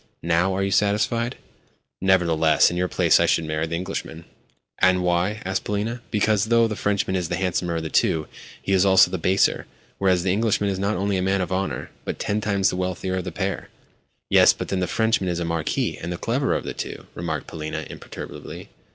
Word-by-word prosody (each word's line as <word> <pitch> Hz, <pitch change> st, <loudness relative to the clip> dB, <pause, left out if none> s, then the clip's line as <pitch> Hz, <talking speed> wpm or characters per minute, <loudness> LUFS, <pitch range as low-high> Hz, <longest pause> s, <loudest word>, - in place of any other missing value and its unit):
Now 85 Hz, +3 st, +2 dB
are 95 Hz, -, 0 dB
you 95 Hz, -, -1 dB
satisfied?" 105 Hz, +5 st, +1 dB, 0.7 s
"Nevertheless, 85 Hz, -5 st, +3 dB
in -, -, -4 dB
your 90 Hz, +1 st, 0 dB
place -, -, +3 dB
I -, -, +3 dB
should 80 Hz, -, +2 dB
marry 80 Hz, +1 st, -2 dB
the 85 Hz, -, -3 dB
Englishman." 85 Hz, -2 st, -5 dB, 0.5 s
"And 90 Hz, 0 st, +4 dB
why?" 90 Hz, +5 st, 0 dB
asked 95 Hz, 0 st, -1 dB
Polina. 110 Hz, +4 st, -2 dB
"Because, 105 Hz, -1 st, +2 dB
though 115 Hz, 0 st, +4 dB
the 110 Hz, -, -4 dB
Frenchman 100 Hz, -2 st, 0 dB
is 90 Hz, -3 st, -2 dB
the 90 Hz, -, 0 dB
handsomer 90 Hz, -2 st, -1 dB
of 80 Hz, -, -2 dB
the 80 Hz, -, -5 dB
two, 80 Hz, -1 st, +2 dB, 0.3 s
he -, -, -4 dB
is 95 Hz, -1 st, +4 dB
also 95 Hz, -1 st, +5 dB
the 95 Hz, -, -2 dB
baser; 95 Hz, +4 st, +2 dB, 0.3 s
whereas 95 Hz, -2 st, +2 dB
the 95 Hz, -1 st, +1 dB
Englishman 105 Hz, -1 st, +1 dB
is 95 Hz, -, -3 dB
not 100 Hz, +2 st, 0 dB
only 100 Hz, +1 st, 0 dB
a -, -, 0 dB
man 95 Hz, +1 st, +1 dB
of 90 Hz, -, -3 dB
honour, 95 Hz, +1 st, -2 dB
but -, -, -4 dB
ten 105 Hz, +1 st, -1 dB
times 100 Hz, -3 st, +1 dB
the -, -, -4 dB
wealthier 95 Hz, 0 st, -2 dB
of 90 Hz, -, -3 dB
the -, -, -4 dB
pair." -, -, -3 dB, 0.6 s
"Yes? -, -, +6 dB
But -, -, -6 dB
then 95 Hz, -, -1 dB
the 90 Hz, -, 0 dB
Frenchman 110 Hz, -2 st, +1 dB
is 85 Hz, -1 st, -2 dB
a 85 Hz, -, -2 dB
marquis, 85 Hz, -2 st, -1 dB
and 85 Hz, -, -4 dB
the 85 Hz, -, -3 dB
cleverer 130 Hz, +8 st, 0 dB
of -, -, -2 dB
the -, -, -5 dB
two," -, -, -6 dB
remarked 80 Hz, -4 st, -4 dB
Polina 80 Hz, -1 st, -5 dB
imperturbably. -, -, -9 dB
95 Hz, 210 wpm, -23 LUFS, 85-100 Hz, 0.7 s, Yes